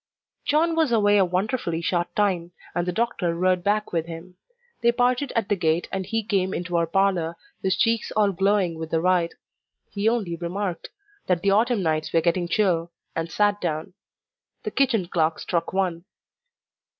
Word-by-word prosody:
John 320 Hz, +3 st, +2 dB
was 320 Hz, -5 st, +2 dB
away 205 Hz, -2 st, +4 dB
a -, -, +6 dB
wonderfully 180 Hz, -1 st, -1 dB
short 175 Hz, +1 st, -1 dB
time, 180 Hz, -4 st, 0 dB, 0.2 s
and 175 Hz, 0 st, -1 dB
the -, -, +1 dB
doctor 180 Hz, -5 st, -1 dB
rode 180 Hz, 0 st, +1 dB
back 210 Hz, +1 st, 0 dB
with 165 Hz, -1 st, 0 dB
him. 170 Hz, +2 st, -9 dB, 0.5 s
They 235 Hz, -, +4 dB
parted 250 Hz, +2 st, +1 dB
at 225 Hz, -4 st, +1 dB
the 205 Hz, -, +2 dB
gate, 165 Hz, -2 st, 0 dB
and 190 Hz, -1 st, -3 dB
he 225 Hz, -1 st, -1 dB
came 195 Hz, -3 st, 0 dB
into 175 Hz, 0 st, -3 dB
our 170 Hz, -1 st, +2 dB
parlour, 175 Hz, -2 st, +1 dB, 0.2 s
his 190 Hz, 0 st, +1 dB
cheeks 230 Hz, +2 st, +1 dB
all 205 Hz, -2 st, +4 dB
glowing 195 Hz, -3 st, +1 dB
with 160 Hz, -1 st, -5 dB
the 165 Hz, -, +1 dB
ride. 175 Hz, -1 st, +1 dB, 0.6 s
He 205 Hz, +2 st, +1 dB
only 210 Hz, -8 st, -1 dB
remarked, 180 Hz, +2 st, -4 dB, 0.4 s
"that 180 Hz, -1 st, +1 dB
the 200 Hz, -, +3 dB
autumn 220 Hz, 0 st, +2 dB
nights 155 Hz, -1 st, 0 dB
were 165 Hz, -, +3 dB
getting 175 Hz, +1 st, +1 dB
chill," 170 Hz, -3 st, +1 dB, 0.2 s
and 165 Hz, 0 st, -2 dB
sat 205 Hz, 0 st, +2 dB
down. 155 Hz, -1 st, -3 dB, 0.7 s
The -, -, -3 dB
kitchen 235 Hz, -9 st, +1 dB
clock 160 Hz, -2 st, +1 dB
struck 170 Hz, -2 st, -2 dB
one. 180 Hz, -3 st, -1 dB
185 Hz, 175 wpm, -24 LUFS, 170-210 Hz, 0.7 s, a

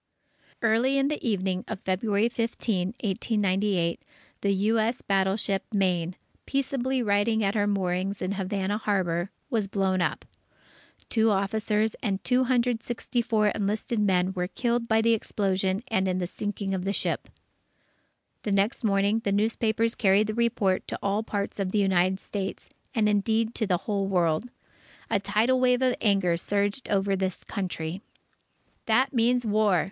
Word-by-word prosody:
Early 245 Hz, +5 st, +3 dB
in 275 Hz, +1 st, +2 dB
the 300 Hz, -, -3 dB
evening 190 Hz, -3 st, 0 dB
of 220 Hz, -, -5 dB
February 200 Hz, +3 st, +1 dB
15, 230 Hz, -4 st, -1 dB
1898, 195 Hz, -3 st, 0 dB, 0.4 s
the 200 Hz, -, +2 dB
U. 210 Hz, +4 st, +2 dB
S. 230 Hz, +3 st, -1 dB
battleship 195 Hz, 0 st, +1 dB
Maine, 180 Hz, -4 st, 0 dB, 0.3 s
peaceably 265 Hz, -2 st, 0 dB
riding 215 Hz, +1 st, +2 dB
at 195 Hz, 0 st, +1 dB
her 205 Hz, -2 st, +1 dB
moorings 195 Hz, 0 st, -1 dB
in 185 Hz, -, -2 dB
Havana 200 Hz, +1 st, -2 dB
Harbour, 185 Hz, -4 st, 0 dB, 0.2 s
was 220 Hz, -5 st, +1 dB
blown 190 Hz, -2 st, 0 dB
up. -, -, -1 dB, 0.9 s
Two 225 Hz, -1 st, +3 dB
officers 210 Hz, +2 st, +1 dB
and 200 Hz, -4 st, -2 dB
264 240 Hz, -3 st, +1 dB
enlisted 210 Hz, +3 st, -1 dB
men 190 Hz, -2 st, +2 dB
were 180 Hz, -1 st, -2 dB
killed 235 Hz, +3 st, -1 dB
by 220 Hz, 0 st, +3 dB
the 230 Hz, 0 st, +4 dB
explosion 195 Hz, -2 st, -1 dB
and 190 Hz, -6 st, +1 dB
in 185 Hz, -1 st, 0 dB
the 180 Hz, -, -1 dB
sinking 200 Hz, +1 st, -4 dB
of 185 Hz, -1 st, -2 dB
the 195 Hz, +1 st, -1 dB
ship. -, -, -2 dB, 1.1 s
The 210 Hz, -, -3 dB
next 200 Hz, +6 st, +1 dB
morning, 200 Hz, +1 st, +2 dB
the 205 Hz, -3 st, -2 dB
newspapers 225 Hz, +2 st, +1 dB
carried 200 Hz, 0 st, +3 dB
the 215 Hz, -, -3 dB
report 220 Hz, -5 st, +1 dB
to -, -, -4 dB
all 200 Hz, +2 st, +1 dB
parts 205 Hz, -2 st, -4 dB
of 190 Hz, -2 st, -1 dB
the 215 Hz, -, 0 dB
United 190 Hz, -1 st, +2 dB
States, 195 Hz, -2 st, -5 dB, 0.3 s
and, 220 Hz, -2 st, +3 dB
indeed, 220 Hz, +2 st, +1 dB
to 220 Hz, -, -1 dB
the 180 Hz, -2 st, +2 dB
whole 200 Hz, +1 st, -2 dB
world. 175 Hz, +3 st, +1 dB, 0.6 s
A 205 Hz, -, +3 dB
tidal 225 Hz, +6 st, +2 dB
wave 250 Hz, 0 st, +3 dB
of 255 Hz, -1 st, +3 dB
anger 195 Hz, -5 st, +2 dB
surged 205 Hz, +7 st, -1 dB
over 195 Hz, -1 st, +1 dB
this 190 Hz, -1 st, -2 dB
Country. 180 Hz, -3 st, -4 dB, 0.9 s
"That 255 Hz, +5 st, +3 dB
means 245 Hz, 0 st, +2 dB
war!" 210 Hz, -4 st, +3 dB
205 Hz, 150 wpm, -27 LUFS, 190-225 Hz, 1.1 s, the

